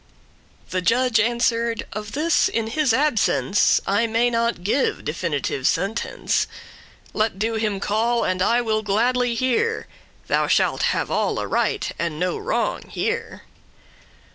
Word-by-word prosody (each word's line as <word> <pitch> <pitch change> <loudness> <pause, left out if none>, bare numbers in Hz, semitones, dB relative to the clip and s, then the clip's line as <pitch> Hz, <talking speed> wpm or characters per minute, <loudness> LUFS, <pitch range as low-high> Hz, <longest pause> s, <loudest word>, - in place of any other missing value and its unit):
The 185 - 0
judge 235 +3 +2
answer'd, 235 0 +1
"Of 215 0 -6
this, 315 +3 +2
in 225 -1 -1
his 290 +1 +1
absence, 225 -6 +2
I 205 +4 +1
may 230 +2 +1
not 230 -5 0
give 255 +8 0
definitive 150 -4 -2
sentence. 195 +6 -1 0.7
Let 215 -2 0
do* 225 +3 -1
him 215 -3 -1
call, 230 +4 +1
and 185 0 -1
I 235 +5 +3
will 220 -2 0
gladly 240 +4 +1
hear; 260 - +1 0.4
*cause - - -30
Thou - - +1
shalt - - +2
have - - -1
alle - - 0
right, - - 0
and 165 -3 -2
no 180 +1 0
wrong 470 +4 -2
here." 460 0 -3
230 Hz, 140 wpm, -22 LUFS, 205-245 Hz, 0.7 s, I